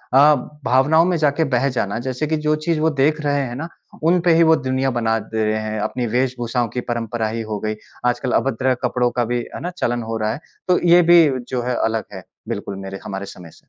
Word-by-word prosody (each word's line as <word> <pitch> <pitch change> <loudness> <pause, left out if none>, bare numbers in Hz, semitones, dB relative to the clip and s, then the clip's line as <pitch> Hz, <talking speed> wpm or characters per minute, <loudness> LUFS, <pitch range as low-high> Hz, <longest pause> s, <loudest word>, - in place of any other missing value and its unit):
अ, 145 +2 +7 0.3
भावनाओं 150 +6 +4
में 180 0 +1
जाकर 155 +1 +2
बह 125 +1 +2
जाना 100 -2 -1
जैसे 130 +4 -2
कि 155 +1 0
जो 150 0 +1
चीज़ 165 -2 +1
वो 160 +1 +3
देख 155 +3 +2
रहे 145 -1 +1
हैं 120 -2 -5
ना 150 +6 -5 0.4
उनपे 175 -1 +3
ही 165 - +5
वो 160 0 +5
दुनिया 130 -2 -1
बना 115 -1 +1
दे 110 +1 -3
रहे 110 0 0
हैं। 110 0 -3
अपनी 125 +2 -2
वेशभूषाओं 120 0 -1
की 125 - -1
परंपरा 115 -1 -2
ही 115 +1 -3
हो 105 - -2
गयी। 110 +1 -3 0.3
आजकल 125 +1 0
अभद्र 130 0 0
कपड़ों 125 -1 +1
का 120 0 0
भी, 120 +1 -1 0.2
है - - -5
ना? 175 - -3
चलन 120 -6 -1
हो 115 - -1
रहा 110 0 -1
है। - - -7 0.3
तो 180 -1 +3
ये 175 +1 +8
भी 170 -1 +8 0.2
जो 125 -2 -2
है 125 0 -1
अलग 110 -1 -1
है 95 -2 -8 0.3
बिल्कुल 100 - -4
मेरे 95 0 -6
हमारे 100 0 -5
समय 90 -3 -11
से। - - -20
125 Hz, 230 wpm, -20 LUFS, 115-150 Hz, 0.4 s, ये